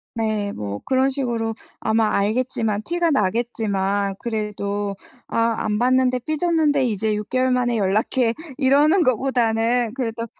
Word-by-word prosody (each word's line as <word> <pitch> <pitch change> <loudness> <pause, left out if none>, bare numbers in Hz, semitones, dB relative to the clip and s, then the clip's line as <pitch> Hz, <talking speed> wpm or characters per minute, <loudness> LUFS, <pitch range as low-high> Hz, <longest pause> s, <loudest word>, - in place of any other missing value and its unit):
네, 215 -2 -1
뭐 100 0 -5
그런 265 +1 +2
식으로 235 -4 -2 0.3
아마 220 0 +2
알겠지만 215 0 0
티가 340 +2 0
나겠지만 200 -3 0
그래도 205 -3 -3 0.3
아 230 0 +1
"안 210 -1 -1
봤는데 255 +1 +2
삐졌는데 310 -3 +1
이제 215 -1 0
6개월 255 +5 0
만에 245 -2 +1
연락해." 215 +4 +1 0.2
이러는 295 +6 +4
것보다는 240 -2 +1
그래도 230 -3 -3
230 Hz, 290 characters per minute, -22 LUFS, 210-260 Hz, 0.3 s, 이러는